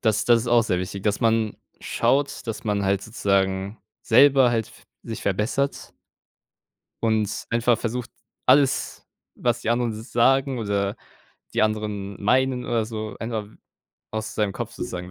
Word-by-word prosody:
das 110 -2 +1
das 120 -1 +5
ist - - -7
auch 120 -1 +4
sehr 90 -5 0
wichtig, 95 +2 -5
dass 105 0 0
man 115 -2 +1 0.2
schaut, 140 -1 0
dass 115 0 -5
man 105 -2 0
halt 95 0 +1
sozusagen 100 -2 0 0.2
selber 135 +1 +6
halt 115 -2 -1
f - - -19 0.2
sich 115 -2 -6
verbessert 110 +8 -1 1.1
und 110 -2 0
einfach 120 0 +2
versucht, 120 +1 -3 0.4
alles, 135 +1 +3 0.3
was 120 -1 0
die 115 - -1
anderen 120 -1 +1
so 110 0 -7
sagen 130 +3 +2
oder 100 -2 -1 0.6
die - - +2
anderen 105 -2 -2
meinen 125 +3 +2
oder 115 -3 0
so, 110 -1 -6
einfach 115 -2 -3 0.6
aus 110 0 -4
seinem 105 -2 0
Kopf - - -5
sozusagen 90 0 -6
110 Hz, 150 wpm, -24 LUFS, 105-120 Hz, 1.1 s, selber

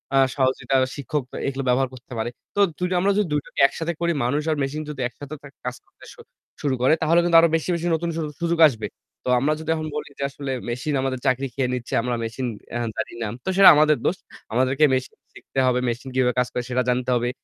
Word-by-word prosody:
আ - - +5 0.2
সহযোগিতা 130 0 +1 0.2
শিক্ষক 145 0 -2
এ - - -4
এগুলো 135 0 -2
ব্যবহার 125 +1 +2
করতে 130 +1 -14
পারে। 110 +2 -1 0.3
তো - - -1 0.2
২ 180 - -5
টা 185 - 0
আমরা 200 +2 +3
যদি 210 - +3
২ - - +3
টোকে - - -9
একসাথে 165 +4 -4
করি 170 0 +2
মানুষ 135 +5 +1
আর 155 - +1
মেশিন 145 +3 -3
যদি 140 -3 -5
একসাথে 140 +5 -10
থে 140 - -11 0.2
কাজ 125 - -3
করতে - - -23
শু - - -21 0.4
শুরু 140 -3 +1
করে 130 +5 +5
তাহলে 165 +2 +4
কিন্তু 170 -1 +5
আরো 170 - +4
বেশি, 160 - -1
বেশি, 170 0 -3
নতুন 170 +1 -2
সু - - -1 0.2
সুযোগ 170 0 0
আসবে। 115 -5 -5 0.4
তো - - -3
আমরা 150 +4 +2
যদি 160 - -7
এখন 155 -1 -4
বলি 150 - -4
যে - - -2
আসলে 140 -1 -6 0.2
মেশিন 125 +5 -2
আমাদের 130 -1 -2
চাকরি 130 +2 +1
খেয়ে 130 -2 -1
নিচ্ছে, 125 -1 -5
আমরা 125 +1 -1
মেশিন 115 +3 -3 0.3
এহ 120 - -1
জানি - - -3
না। 110 - -2 0.2
তো - - -1
সেটা 195 - +10
আমাদের 150 0 +4
দোষ। 185 - +1 0.4
আমাদেরকে 130 +5 +3
মেশিন 130 0 -2 0.2
শিখতে 135 - -5
হবে, 125 0 +2
মেশিন 125 +3 -4
কিভাবে 125 -1 +2
কাজ 125 - +2
করে 125 - -2
সেটা 125 0 +1
জানতে 125 +1 0
হবে। 120 0 0
135 Hz, 235 wpm, -23 LUFS, 125-155 Hz, 0.4 s, সেটা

